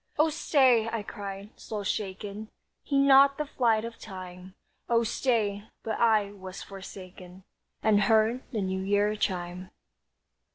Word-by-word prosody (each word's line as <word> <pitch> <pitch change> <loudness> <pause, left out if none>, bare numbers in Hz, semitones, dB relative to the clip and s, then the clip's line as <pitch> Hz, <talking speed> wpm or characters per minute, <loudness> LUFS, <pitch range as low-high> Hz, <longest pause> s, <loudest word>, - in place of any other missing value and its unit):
"Oh, 310 +2 +4
stay," 260 -8 +3
I 225 -2 -3
cried, 200 0 -7
soul 210 -2 -5
shaken, 205 +1 -4 0.3
"Heed 275 -1 +2
not 275 0 +6
the 300 - -2
flight 230 -5 +1
of 230 0 -8
time, 185 -2 -10 0.3
Oh 235 0 +3
stay," 215 -4 0 0.2
But 220 -1 -3
I 215 -3 +3
was 190 -2 -9
forsaken, 185 -1 -11 0.4
And 210 -2 +4
heard 220 +4 +3
the 220 -5 -2
New 190 0 -2
Year 205 +2 +1
chime. 180 -2 -3
210 Hz, 135 wpm, -28 LUFS, 190-230 Hz, 0.4 s, not